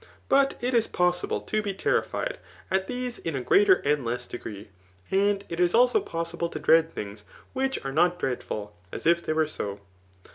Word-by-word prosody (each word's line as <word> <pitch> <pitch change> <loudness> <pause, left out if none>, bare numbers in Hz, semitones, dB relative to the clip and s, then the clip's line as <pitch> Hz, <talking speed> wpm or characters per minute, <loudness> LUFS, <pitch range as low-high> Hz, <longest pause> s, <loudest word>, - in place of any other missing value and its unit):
But 275 0 +4
it 250 +1 -1
is 230 -2 +3
possible 180 0 0
to 215 - -1
be 200 -2 -3
terrified - - -1 0.3
at 190 0 +1
these 250 -1 -4
in 165 -3 -3
a 130 - -2
gf^aer 390 - +4
and 150 -2 +2
less 120 +1 -3
degree, 105 -4 -8 0.4
and 200 +1 +2
it 170 - -5
is 175 +2 +3
also 245 +1 +5
possible 170 0 -3
to - - -6
dread 165 0 +4
things 105 0 -7 0.3
which 265 0 0
are 135 - -2
not 175 +3 +3
dreadful, 110 - -4 0.2
as - - -7
if 170 +1 +4
they 155 - -1
were 160 0 +2
so. 100 -9 -5
175 Hz, 185 wpm, -27 LUFS, 140-225 Hz, 0.4 s, also